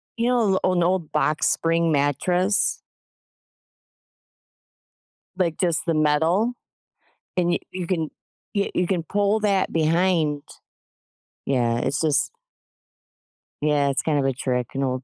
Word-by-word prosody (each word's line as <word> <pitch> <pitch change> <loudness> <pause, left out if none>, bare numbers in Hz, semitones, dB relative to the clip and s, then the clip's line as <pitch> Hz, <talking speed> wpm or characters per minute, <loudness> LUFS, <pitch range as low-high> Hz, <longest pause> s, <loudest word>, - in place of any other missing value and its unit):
you 235 +1 0
know, 250 - +2 0.3
a - - +3
l - - +1
an 175 - +3
old 175 -2 0
box 150 0 +1
spring 165 0 +1
mattress? 175 +7 +1 2.6
Like, 170 -4 0
just 170 -3 0
the 165 - +1
metal 160 +9 +2 0.8
and 175 -1 +2
you - - 0
you 180 -2 -5
can 165 -4 -1 0.4
yeah, 200 -1 0
you 180 - +1
can 175 -3 -1
pull 205 +4 +1
that 200 -3 +1
behind. 165 -2 +1 1.0
Yeah, 120 -3 +1
it's 135 +3 -1
just 155 -3 +1 1.3
Yeah, 145 -1 +2
it's 135 - 0
kind 155 -2 0
of 140 - +1
a 135 - +1
trick, 125 -1 -2
an 135 - -1
old 130 -1 -2
165 Hz, 135 wpm, -23 LUFS, 145-185 Hz, 2.6 s, a